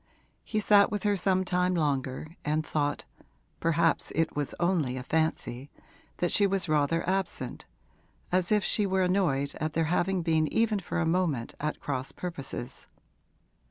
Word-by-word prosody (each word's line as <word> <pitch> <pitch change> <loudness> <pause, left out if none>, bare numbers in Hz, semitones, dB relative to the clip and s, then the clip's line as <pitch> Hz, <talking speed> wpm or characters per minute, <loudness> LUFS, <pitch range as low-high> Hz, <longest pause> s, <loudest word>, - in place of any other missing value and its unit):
He 215 - -1
sat 205 -1 +5
with 205 -3 -3
her 205 -1 +2
some 185 -1 +1
time 180 0 +1
longer 145 0 -1
and 155 +1 0
thought 145 -1 -1 0.5
perhaps 165 0 +1
it 165 0 0
was 145 -1 -2
only 170 -8 +1
a 125 - -5
fancy 145 -3 -1 0.5
that 175 - 0
she 205 - +4
was 195 -2 0
rather 155 +2 +1
absent, 185 -9 -2 0.6
as 180 +1 +1
if 210 -2 +3
she 210 -2 +1
were 190 0 +2
annoyed 165 -7 +1
at 155 0 -2
their 165 - +1
having 180 0 +1
been 160 -2 +1
even 220 -2 +2
for 180 - -4
a 170 - +1
moment 160 -8 0
at 150 +1 -2
cross 135 -1 -3
purposes. 140 -7 -6
165 Hz, 160 wpm, -28 LUFS, 145-185 Hz, 0.6 s, sat